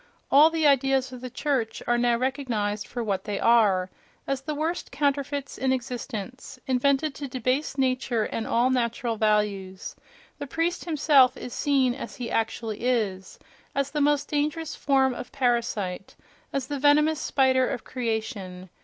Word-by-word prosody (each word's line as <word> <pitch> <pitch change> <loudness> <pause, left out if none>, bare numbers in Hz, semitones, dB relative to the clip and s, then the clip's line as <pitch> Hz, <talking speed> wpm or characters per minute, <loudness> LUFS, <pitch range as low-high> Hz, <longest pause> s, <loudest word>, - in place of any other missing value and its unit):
All 295 +3 +8
the 325 -1 0
ideas 270 -2 +3
of 250 - -9
the 255 - -6
church 255 -3 -2
are 240 0 +2
now 240 -1 +2
recognized 235 -6 -2
for 240 -1 -4
what 195 -3 -2
they 205 -2 -3
are—as 220 +4 +1
the 300 +2 -4
worst 320 +4 -3
counterfeits 280 0 -1
in 265 0 +1
existence, 250 -1 -5
invented 275 +3 +1
to 280 0 -6
debase 255 +3 -1
nature 255 -3 +1
and 220 +1 -3
all 245 +3 +2
natural 235 -1 0
values; 210 -3 -1 0.4
the 285 - -5
priest 330 +5 -1
himself 285 -5 +4
is 245 - -7
seen 270 -4 +2
as 275 - -7
he 245 -3 -5
actually 225 -1 -2
is—as 240 +4 -3
the 300 - -1
most 290 0 +2
dangerous 300 +2 -2
form 265 -2 +2
of 245 - -8
parasite, 235 -8 -1 0.4
as 275 -2 -2
the 285 +1 -4
venomous 300 +2 +4
spider 260 -2 +2
of 240 - -4
creation.... 215 -7 -4
255 Hz, 150 wpm, -26 LUFS, 225-280 Hz, 0.4 s, All